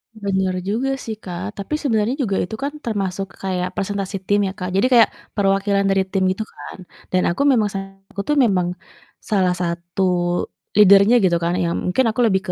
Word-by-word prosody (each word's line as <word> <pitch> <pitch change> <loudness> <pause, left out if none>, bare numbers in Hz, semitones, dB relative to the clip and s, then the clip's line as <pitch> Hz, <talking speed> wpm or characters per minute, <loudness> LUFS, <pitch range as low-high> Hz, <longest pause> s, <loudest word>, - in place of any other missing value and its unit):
Bener 190 -3 -1
juga 235 +7 0
sih, 230 -4 -6
Kak, 185 +3 -5
tapi 200 +9 -3
sebenarnya 230 -3 +1
juga 200 -5 -1
itu 180 - -5
kan 285 +1 -2
termasuk 195 -3 -2 0.2
kayak 185 -1 -1
presentasi 200 0 -3
tim 205 0 +3
ya, 190 - -4
Kak, 180 0 -4
jadi 215 +6 +3
kayak 230 -2 +7 0.3
perwakilan 200 0 +2
dari 195 -1 +1
tim 190 0 0
gitu 220 +4 -3
kan 185 -2 -11 0.2
dan 185 - +2
aku 175 +11 0
memang 225 -5 +3
salah 195 0 -6 0.2
satu 200 - -5
tuh, 295 - +2
memang 185 -5 +1 0.5
salah 185 -4 +1
satu 175 +1 -4 0.8
leader-nya 200 +2 +7
gitu 175 -2 +3
kan 170 - +1
yang 170 -1 0
mungkin 260 +8 +2
aku 220 +3 -1
lebih 190 -4 +2
195 Hz, 180 wpm, -20 LUFS, 185-215 Hz, 0.8 s, kayak